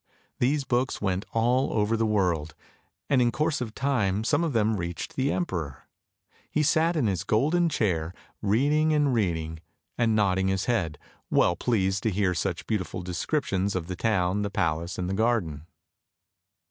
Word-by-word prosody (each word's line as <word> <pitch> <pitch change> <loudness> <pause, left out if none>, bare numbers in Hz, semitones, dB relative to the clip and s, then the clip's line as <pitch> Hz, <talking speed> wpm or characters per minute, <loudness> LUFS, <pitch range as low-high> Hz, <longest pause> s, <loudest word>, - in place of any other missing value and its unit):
These 140 +3 +2
books 125 0 0
went 95 0 -1
all 120 +4 +2
over 105 +1 +1
the 115 0 +1
world, 90 -7 0 0.5
and 135 -3 +3
in 120 -1 +3
course 155 -1 0
of 115 -3 -5
time 110 -7 0
some 145 +7 +2
of 165 - 0
them 110 -3 +1
reached 85 -1 -5
the 135 +1 +1
emperor. 85 - -3 0.6
He 155 - +1
sat 160 +3 +2
in 150 -7 +1
his 95 -6 0
golden 155 +10 +2
chair 85 - 0 0.3
reading 145 +9 +2
and 145 -3 +2
reading, 80 -7 -1 0.4
and 115 -2 +3
nodding 95 -2 +2
his 95 +1 0
head, 85 -11 0 0.3
well 85 - +3
pleased 100 -4 0
to 110 - +1
hear 95 -2 +1
such 90 0 -2
beautiful 95 -4 -3
descriptions 95 - -1
of 90 -3 -2
the 90 +1 -5
town, 95 -1 +1
the 100 - -1
palace, 85 -1 -1
and 90 - -2
the 95 - -2
garden. 95 -9 0
105 Hz, 165 wpm, -27 LUFS, 90-125 Hz, 0.6 s, and